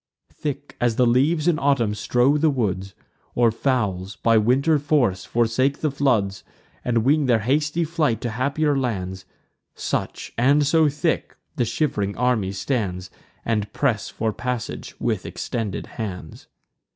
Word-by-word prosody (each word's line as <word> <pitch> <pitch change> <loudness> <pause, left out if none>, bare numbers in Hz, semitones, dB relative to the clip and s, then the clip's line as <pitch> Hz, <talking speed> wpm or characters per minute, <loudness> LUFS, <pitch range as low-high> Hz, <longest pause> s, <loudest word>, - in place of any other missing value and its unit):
Thick 145 -1 -5
as 120 -2 +2
the 125 - +3
leaves 145 +7 +2
in 165 -2 +3
autumn 135 -8 +2
strow 125 +6 +2
the 155 +1 +3
woods, 100 -8 -2 0.4
Or 120 -2 +4
fowls, 105 -6 -1
by 115 -1 +2
winter 135 +8 +3
forc'd, 135 -11 +1
forsake 120 +4 +1
the 155 - +1
floods, 110 -9 +1 0.4
And 115 -2 +1
wing 145 +2 +3
their 115 -3 +3
hasty 150 +7 +1
flight 155 -7 0
to 120 - -2
happier 140 +5 0
lands; 95 -8 -3 0.5
Such, - - -3
and 140 +4 +4
so 155 +1 +4
thick, 150 +3 -1 0.2
the 125 -6 +1
shiv'ring 105 -5 -1
army 120 -6 +1
stands, 95 -4 -2 0.3
And 105 -3 -1
press 120 -7 0
for 110 -1 -2
passage 125 -1 -5
with - - -1
extended 110 -5 -4
hands. 90 -8 -7
125 Hz, 140 wpm, -23 LUFS, 105-145 Hz, 0.5 s, Or